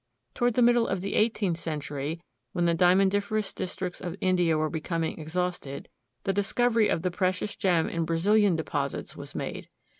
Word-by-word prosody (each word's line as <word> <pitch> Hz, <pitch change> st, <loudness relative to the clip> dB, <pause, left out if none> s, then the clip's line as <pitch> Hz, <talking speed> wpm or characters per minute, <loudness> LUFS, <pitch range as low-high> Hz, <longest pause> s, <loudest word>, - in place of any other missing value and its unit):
Toward 240 Hz, -1 st, +1 dB
the 245 Hz, -, +4 dB
middle 240 Hz, -1 st, +4 dB
of 190 Hz, -1 st, -1 dB
the 195 Hz, -, -3 dB
eighteenth 215 Hz, -6 st, +1 dB
century, 150 Hz, 0 st, -4 dB, 0.3 s
when 175 Hz, -1 st, +1 dB
the 170 Hz, -, +3 dB
diamondiferous 195 Hz, +4 st, +2 dB
districts 180 Hz, 0 st, -4 dB
of 175 Hz, -1 st, -4 dB
India 180 Hz, -4 st, +2 dB
were 155 Hz, 0 st, +1 dB
becoming 165 Hz, +1 st, -2 dB
exhausted, 160 Hz, -3 st, -3 dB, 0.3 s
the 195 Hz, -, 0 dB
discovery 225 Hz, +3 st, +2 dB
of 165 Hz, -, 0 dB
the 180 Hz, -, 0 dB
precious 185 Hz, +3 st, -1 dB
gem 175 Hz, -4 st, +2 dB
in 170 Hz, 0 st, -1 dB
Brazilian 195 Hz, +4 st, +3 dB
deposits 145 Hz, -3 st, -3 dB
was -, -, -9 dB
made. -, -, -5 dB
180 Hz, 160 wpm, -27 LUFS, 165-200 Hz, 0.3 s, the